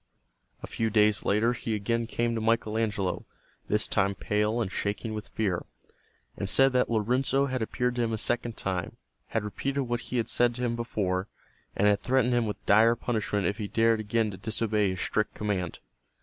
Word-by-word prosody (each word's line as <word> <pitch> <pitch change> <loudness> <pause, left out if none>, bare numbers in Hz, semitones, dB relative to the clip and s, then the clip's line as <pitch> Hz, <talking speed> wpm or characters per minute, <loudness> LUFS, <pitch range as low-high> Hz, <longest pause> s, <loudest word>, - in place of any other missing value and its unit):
A - - -2
few 115 0 -1
days 105 -1 +3
later 110 +4 +3
he 110 -3 -3
came 115 +3 0
again 115 0 -1
to 115 - -2
Michael 110 -1 +1
Angelo, 105 -4 -1 0.4
this 105 +1 +1
time 100 -1 +1
pale 105 +3 0
and 105 -5 -1
shaking 105 +2 -3
with 105 -1 -5
fear, 95 -5 -1 0.7
and 100 - -4
said 135 +4 +5
that 125 0 +2
Lorenzo 125 +5 +1
had 130 -2 -2
appeared 125 +2 -1
to - - +1
him 115 -1 0
a 110 - -1
second 120 +1 -1
time, 95 -2 -3 0.3
had 110 - -1
repeated 135 +6 -2
what 120 -1 -2
he 125 - -4
had 115 - 0
said 120 -1 +2
to 125 - -4
him 120 -1 0
before, 100 -5 -1 0.5
and 100 - +2
had 100 0 +3
threatened 125 -1 +2
him 120 -2 +2
with 105 - -6
dire 110 +3 +5
punishment 110 -4 -1
if 105 +1 -1
he 105 - -2
dared 115 +1 +2
again 110 0 0
to 95 - -8
disobey 110 -2 0
his 95 0 -3
strict 110 -1 -1
command. 95 -5 -2
110 Hz, 195 wpm, -28 LUFS, 105-120 Hz, 0.7 s, said